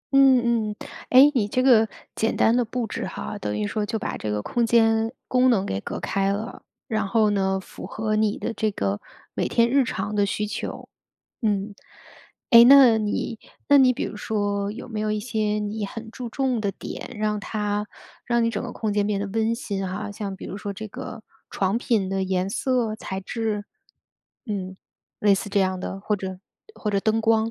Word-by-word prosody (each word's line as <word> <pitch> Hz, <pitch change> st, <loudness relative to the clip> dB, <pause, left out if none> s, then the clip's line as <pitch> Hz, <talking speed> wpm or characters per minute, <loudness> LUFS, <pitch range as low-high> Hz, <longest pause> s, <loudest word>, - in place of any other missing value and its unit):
嗯， 240 Hz, -5 st, +4 dB
嗯， 210 Hz, -, -5 dB, 0.3 s
哎， 270 Hz, +3 st, +8 dB
你 225 Hz, -7 st, +1 dB
这 255 Hz, +5 st, 0 dB
个 225 Hz, -4 st, +6 dB, 0.3 s
简 225 Hz, -, 0 dB
单 225 Hz, +2 st, +4 dB
的 245 Hz, -, +3 dB
布 235 Hz, +1 st, -3 dB
置 205 Hz, -, -4 dB
哈， 210 Hz, -, -6 dB
等 105 Hz, 0 st, -3 dB
于 105 Hz, -, -1 dB
说 215 Hz, -, -2 dB
就 210 Hz, +2 st, -2 dB
把 -, -, -4 dB
这 105 Hz, -, -4 dB
个 105 Hz, 0 st, -2 dB
空 240 Hz, -, 0 dB
间 225 Hz, -1 st, +3 dB, 0.2 s
功 255 Hz, 0 st, +4 dB
能 200 Hz, -5 st, +2 dB
给 95 Hz, +1 st, -3 dB
隔 -, -, -5 dB
开 195 Hz, 0 st, 0 dB
了， 215 Hz, +4 st, -4 dB, 0.3 s
然 215 Hz, -3 st, -1 dB
后 215 Hz, 0 st, +3 dB
呢， 190 Hz, -1 st, +1 dB
符 -, -, -10 dB
合 215 Hz, -1 st, -2 dB
你 215 Hz, -1 st, +1 dB
的 230 Hz, -, -3 dB
这 220 Hz, -, 0 dB
个 100 Hz, -, -2 dB, 0.3 s
每 -, -, -1 dB
天 235 Hz, 0 st, +3 dB
日 275 Hz, +2 st, +3 dB
常 215 Hz, -3 st, -3 dB
的 205 Hz, -, +3 dB
需 210 Hz, +1 st, -1 dB
求， 210 Hz, -, -5 dB, 0.6 s
嗯。 205 Hz, -1 st, 0 dB, 0.8 s
哎， 235 Hz, -2 st, +10 dB
那 255 Hz, -3 st, +8 dB
你 215 Hz, +1 st, -2 dB, 0.3 s
那 285 Hz, -, +7 dB
你 255 Hz, -2 st, +6 dB
比 -, -, -3 dB
如 210 Hz, -, -6 dB
说 205 Hz, -2 st, -1 dB
有 220 Hz, -, -7 dB
没 220 Hz, -2 st, -4 dB
有 215 Hz, 0 st, 0 dB
一 215 Hz, -, 0 dB
些 215 Hz, -2 st, -1 dB
你 210 Hz, 0 st, -3 dB
很 225 Hz, +3 st, -7 dB
注 250 Hz, -2 st, -6 dB
重 255 Hz, -1 st, 0 dB
的 200 Hz, -2 st, 0 dB
点， -, -, -8 dB
让 210 Hz, -1 st, 0 dB
它 210 Hz, 0 st, -2 dB, 0.4 s
让 235 Hz, -1 st, +2 dB
你 230 Hz, -, +2 dB
整 230 Hz, -, -3 dB
个 245 Hz, -, -5 dB
空 215 Hz, -2 st, -2 dB
间 205 Hz, 0 st, +1 dB
变 205 Hz, -2 st, 0 dB
得 200 Hz, -, -2 dB
温 220 Hz, +3 st, 0 dB
馨 195 Hz, -5 st, -3 dB
哈， 205 Hz, +2 st, -4 dB
像 200 Hz, -2 st, -5 dB
比 -, -, -10 dB
如 195 Hz, -, -6 dB
说 205 Hz, -1 st, -5 dB
这 215 Hz, +3 st, -7 dB
个 225 Hz, 0 st, -8 dB, 0.3 s
床 195 Hz, +3 st, 0 dB
品 220 Hz, -5 st, +1 dB
的 195 Hz, 0 st, -1 dB
颜 185 Hz, 0 st, 0 dB
色、 240 Hz, 0 st, 0 dB
材 190 Hz, -3 st, -5 dB
质， 215 Hz, 0 st, -3 dB, 0.8 s
嗯， 190 Hz, -3 st, -4 dB, 0.4 s
类 205 Hz, -1 st, +4 dB
似 200 Hz, -, -3 dB
这 200 Hz, -, +1 dB
样 185 Hz, -1 st, 0 dB
的， 195 Hz, -, -5 dB
或 210 Hz, +1 st, 0 dB
者 190 Hz, -1 st, -6 dB, 0.4 s
或 210 Hz, -, -2 dB
者 200 Hz, -, +1 dB
灯 220 Hz, +2 st, +1 dB
光。 225 Hz, 0 st, +2 dB
215 Hz, 220 characters per minute, -24 LUFS, 200-230 Hz, 0.8 s, 哎